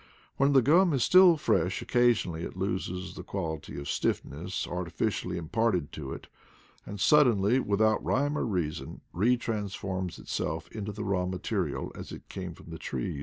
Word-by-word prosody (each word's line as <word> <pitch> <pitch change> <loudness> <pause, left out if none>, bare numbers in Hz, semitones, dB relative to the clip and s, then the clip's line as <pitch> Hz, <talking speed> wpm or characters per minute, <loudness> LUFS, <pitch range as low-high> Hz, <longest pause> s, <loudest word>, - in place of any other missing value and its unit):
When 140 +1 +3
the 135 -3 +6
gum 170 +5 +5
is 135 - +2
still 180 -2 +7
fresh 95 - +1
occasionally 120 -9 +2
it 85 - -6
loses 95 -1 -3
the - - -8
quality 80 -7 -5
of 70 - -7
stiff - - 0
ness - - -4
artificially 90 -1 -2
imparted 90 -1 0
to 70 -3 -6
it, - - -7 0.6
and 100 - -6
suddenly, 120 -3 +4
with 105 -3 +1
out 110 0 +2
rhyme 145 +3 +1
or - - -1
reason, 85 -7 -3
retransf 110 -1 0
orms 95 -2 -3
itself 80 +1 -3
into 105 -1 -5
the 105 +1 -5
raw 95 -3 0
material 95 0 -2
as - - -9
it - - -10
came 90 -3 -6
from 85 - -13
the 80 - -7
tree. 70 +4 -4
100 Hz, 170 wpm, -29 LUFS, 90-120 Hz, 0.6 s, still